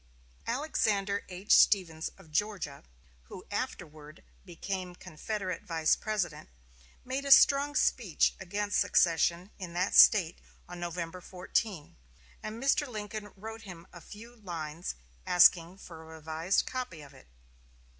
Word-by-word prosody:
Alexander 215 -7 -1
H. 185 +3 -6
Stephens 165 -6 +3
of 180 -5 -18
Georgia, 180 -5 -2 0.4
who 180 - -11
afterward 155 - -6 0.2
became 180 0 -6
Confederate 185 +4 -5
Vice 160 -2 +1
President, 185 -8 -4 0.6
made 260 +2 -3
a 280 - -2
strong 280 +2 +6
speech 215 - +2
against 205 +2 -2
secession 170 +2 +2
in 180 -3 -7
that 180 +2 -1
State 180 -6 +6 0.3
on 175 0 -9
November 175 0 -5
14; 180 -1 -3 0.5
and 225 +4 -7
Mr. 285 +2 +2
Lincoln 210 -2 -7
wrote 220 +3 -9
him 175 -5 -11
a 175 - -11
few 230 +6 -13
lines 170 - -6 0.3
asking 175 0 +5
for 165 -4 -12
a 160 0 -12
revised 160 +4 -1
copy 245 -12 -6
of 140 -1 -15
it. 130 - -18
185 Hz, 125 wpm, -30 LUFS, 165-215 Hz, 0.6 s, strong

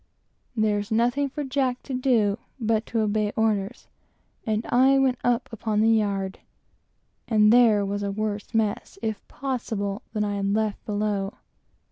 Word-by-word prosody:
There's 210 -2 0
nothing 245 +5 +2
for 295 +2 -4
Jack 260 -2 -1
to 270 - -6
do 235 -5 +2 0.2
but 225 -1 0
to 225 - 0
obey 210 0 0
orders, 220 +1 -1 0.6
and 215 +1 0
I 265 +2 +5
went 260 -2 +2
up 245 +1 +1
upon 215 -1 -1
the 225 +1 +4
yard; 200 -3 0 0.9
and 215 -1 +5
there 225 -4 +5
was 200 +1 -2
a 200 - -1
worse 210 0 -3
"mess," 220 -2 -1
if 220 -2 -2
possible, 220 -7 -3
than 210 -1 -1
I 205 -1 -1
had 200 0 0
left 215 -1 -1
below. 205 -1 -1
215 Hz, 150 wpm, -25 LUFS, 205-245 Hz, 0.9 s, I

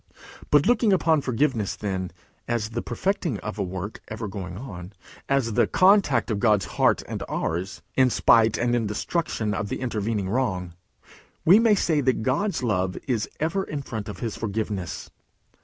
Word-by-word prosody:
But, 145 -1 +5
looking 230 -3 +3
upon 165 -5 +3
forgiveness, 125 -5 0
then, 95 -3 -3 0.4
as 115 -2 -1
the 120 +1 -2
perfecting 170 - -1
of 105 0 -6
a - - +1
work 95 +3 -5
ever 110 0 -5
going 95 -2 -6
on, 95 -6 -8 0.4
as 135 -5 +1
the - - +3
contact 185 - +4
of 105 - -1
God's 105 -4 +3
heart - - +2
and - - -5
ours, 90 +4 -3
in 130 -1 +5
spite 115 -2 +4
and 120 0 +1
in 115 -3 0
destruction 110 -1 -2
of 100 0 -3
the - - -3
intervening 110 -5 -2
wrong, 95 -6 -1 0.7
we 185 +6 +8
may 225 -2 +5
say 160 -6 +1
that 130 -4 +1
God's 145 - 0
love 95 -5 0
is 115 -5 -1
ever 165 +5 0
in 145 -5 -5
front 110 -4 -5
of 105 - -8
his 115 -3 -3
forgiveness. 105 -4 -4
115 Hz, 170 wpm, -25 LUFS, 100-140 Hz, 0.7 s, we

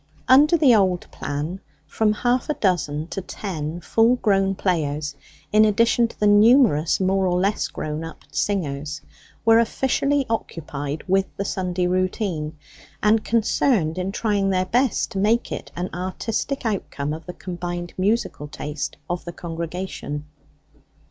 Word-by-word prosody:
Under 295 +6 +6
the 285 -6 +6
old 185 -4 +3
plan, 150 +6 -4 0.3
from 220 -1 +1
half 245 +4 0
a 300 - +1
dozen 155 -6 0
to 195 - -4
ten 175 -4 -5
full 225 +7 +3
grown 195 -4 +2
players, 150 -6 -1 0.4
in 215 +1 +7
addition 230 +2 +3
to - - -16
the 210 - +2
numerous 205 - +5
more 190 0 +2
or 180 0 +1
less 200 +3 +1
grown 155 +1 -4
up 165 - -9
singers, 150 -6 -2 0.4
were 225 0 +6
officially 270 +4 +1
occupied 150 -9 -4
with 190 +1 +2
the 200 - -2
Sunday 180 -2 -1
routine, 180 -3 -1 0.5
and 215 +1 +4
concerned 215 - +1
in 185 +1 -2
trying 205 -2 0
their 185 -1 +1
best 245 +4 +1
to 195 - -3
make 220 +4 +2
it - - -6
an 175 +1 -2
artistic 220 +9 -3
outcome 150 -9 -2
of 160 0 -8
the 180 - -5
combined 175 -1 -5
musical 195 -6 0
taste 145 0 -5
of 175 0 -3
the 170 - -5
congregation. 165 -3 -5
190 Hz, 145 wpm, -23 LUFS, 165-220 Hz, 0.5 s, in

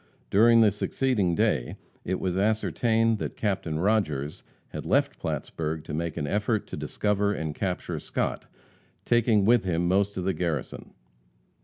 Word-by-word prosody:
During 115 +3 +6
the 105 -2 +5
succeeding 105 -3 0
day - - 0 0.3
it 95 +1 -2
was 90 -1 -1
ascertained 110 +2 +1
that - - -5
Captain 95 -7 -1
Rodgers 80 -7 0 0.3
had - - -6
left - - +1
Plattsburg 80 -1 -3
to 75 - -7
make 85 +1 -3
an 75 - -1
effort 105 +6 0
to - - -5
discover 105 0 0
and 80 -5 -3
capture 90 +2 -3
Scott, - - -3 0.6
taking 115 -4 +3
with 120 -1 +4
him 85 -2 0
most 100 +2 +1
of 90 - -2
the 95 +1 0
garrison. 80 -7 -4
95 Hz, 150 wpm, -27 LUFS, 85-110 Hz, 0.6 s, During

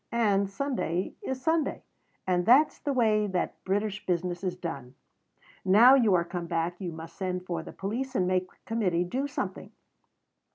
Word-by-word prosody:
And 200 -4 +2
Sunday 195 - -2
is 265 -1 -3
Sunday. 320 -2 0 0.4
And 180 -1 0
that's 275 +6 +5
the 285 - -2
way 215 -5 +2
that 185 -2 -3
British 205 +1 -1
business 175 0 -2
is 180 -2 -1
done. 140 -8 -6 0.7
Now 215 +7 +7
you 230 -8 +5
are 170 -1 +2
come 175 -1 -5
back, 170 +2 -2
you 180 -2 -3
must 160 +1 -9
send 185 -2 -3
for 170 -3 -3
the - - -9
police 245 +7 -4
and 185 - +2
make 185 0 0
the - - -25
Committee 190 -7 0
do 260 +11 -2
something. - - -5
190 Hz, 170 wpm, -28 LUFS, 175-230 Hz, 0.7 s, Now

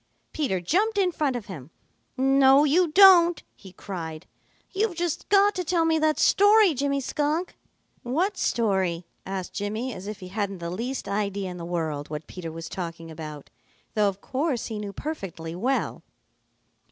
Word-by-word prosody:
Peter 265 -12 -1
jumped 405 - +1
in 375 -3 +3
front 295 -5 -1
of 235 -4 -5
him. 150 -8 -9 0.5
"No, 270 +1 +5
you 335 +5 +3
don't!" 350 0 +7
he 190 - -14
cried. 165 -5 -7 0.5
"You've 410 -1 0
just 345 -2 -3
got 405 +1 +5
to 365 - -3
tell 335 0 +1
me 320 -1 +2
that 310 0 +2
story, 410 -2 +5
Jimmy 280 +1 0
Skunk." 300 +6 -2 0.5
"What 345 +12 0
story?" 190 - 0 0.2
asked 190 -1 -5
Jimmy, 215 +5 -3
as 190 0 -8
if 210 -1 -6
he 185 - -9
hadn't 200 -1 -3
the 170 -1 -5
least 240 +8 -4
idea 200 -2 -2
in 180 - -8
the 170 - -6
world 160 -4 -3
what 150 0 -6
Peter 165 -1 -7
was 165 +1 -7
talking 165 -2 -6
about, 155 -2 -9 0.4
though 210 -1 +3
of 195 0 -8
course 270 -2 -2
he 220 -2 -5
knew 205 -1 -5
perfectly 190 - -6
well. 250 +10 -1
225 Hz, 165 wpm, -25 LUFS, -, 0.5 s, don't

